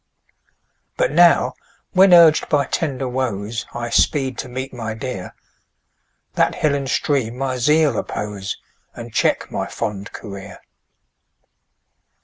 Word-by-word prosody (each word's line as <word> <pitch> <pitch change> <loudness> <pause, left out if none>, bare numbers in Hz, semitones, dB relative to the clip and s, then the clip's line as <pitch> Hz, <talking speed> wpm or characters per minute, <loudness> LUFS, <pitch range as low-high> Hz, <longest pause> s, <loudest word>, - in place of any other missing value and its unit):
But - - +1
now, - - +5 0.4
when 190 0 +5
urg'd 170 -3 +6
by 145 -2 +2
tender 135 -4 -2
woes, 120 -3 -3
I 120 -1 -5
speed 135 -4 +2
to 130 - -5
meet 130 +2 -5
my 110 -3 -5
dear, 125 -6 -6 1.0
That - - +1
hill 150 -2 +1
and 140 -2 -2
stream 130 -6 0
my 130 -1 -2
zeal 150 +4 +3
oppose, 100 -2 -4 0.4
And 120 -1 -9
check - - +1
my - - -3
fond 100 -1 -5
career. 100 -3 -9
130 Hz, 125 wpm, -20 LUFS, 110-145 Hz, 1.0 s, urg'd